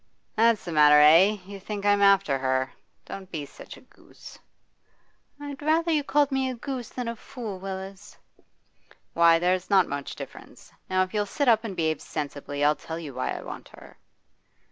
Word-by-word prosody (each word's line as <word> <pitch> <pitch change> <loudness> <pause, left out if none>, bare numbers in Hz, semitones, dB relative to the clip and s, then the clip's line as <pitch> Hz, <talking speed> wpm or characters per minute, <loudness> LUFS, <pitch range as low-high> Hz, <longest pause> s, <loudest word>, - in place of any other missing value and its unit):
'That's 230 -1 +3
the 175 - -5
matter, 150 -1 +6
eh? 170 +8 +6
You 200 +1 -9
think 205 +1 -6
I'm 205 0 +3
after 195 -8 +4
her! 130 0 -1 0.3
Don't 190 -1 -9
be 155 -5 -5
such - - -12
a - - -16
goose.' - - -16 1.0
'I'd 285 -1 -8
rather 325 +3 +1
you 300 -2 +1
call 290 +1 +2
me 265 -1 0
a 255 - -4
goose 250 -1 -6
than 250 -2 -5
a 230 - -3
fool, 220 -4 -8
Willis.' 195 +1 -8 1.0
'Why, 170 0 +5
there's 180 +2 0
not 195 -3 +4
much 140 0 -5
difference. - - -11 0.2
Now 185 0 +2
if 185 - -8
you'll 205 -1 0
sit 285 +6 -2
up 225 -2 +4
and 210 -4 -5
behave 160 -3 -1
sensibly, 145 -1 -5
I'll 150 +1 +4
tell 160 +1 -7
you 155 -5 -7
why 130 - -3
I - - -4
want - - -9
her. - - -15
195 Hz, 185 wpm, -26 LUFS, 160-230 Hz, 1.0 s, matter